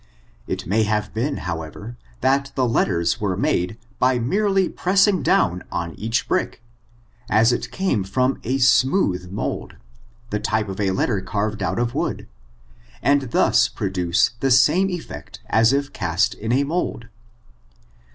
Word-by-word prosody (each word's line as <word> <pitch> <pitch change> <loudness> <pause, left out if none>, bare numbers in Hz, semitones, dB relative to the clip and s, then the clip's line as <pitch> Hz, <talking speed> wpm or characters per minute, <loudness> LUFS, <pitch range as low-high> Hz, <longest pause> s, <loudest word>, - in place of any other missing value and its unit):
It - - -4
may 105 +6 +1
have 105 0 -1
been, 130 +6 -1
however, 85 +7 -6 0.3
that 135 +1 +1
the 130 -2 +1
letters 85 -7 +1
were 95 -3 -1
made 90 +2 0 0.2
by 130 0 +3
merely 195 - +1
pressing 190 0 +2
down 90 -8 +2
on 85 -1 -3
each 115 +7 -2
brick, - - -1 0.7
as 110 +3 +4
it - - -3
came 185 - -1
from 125 +8 0
a 130 +4 0
smooth 125 - +2
moid, 100 - -4 0.6
the 105 - -1
type 105 -1 -1
of 95 - -6
a 100 -2 +1
letter 95 +1 0
carved 105 +2 -3
out 95 -1 -1
of 120 0 -1
wood, - - -3 0.8
and 140 0 +2
thus - - +3
produce 90 -1 0
the 135 - +1
same 150 +10 +4
effect 160 - -7
as 115 +2 +3
if 140 +1 -1
cast 90 0 0
in 110 +2 -4
a 135 +3 +3
mold. 150 -6 -2
115 Hz, 150 wpm, -22 LUFS, 95-135 Hz, 0.8 s, as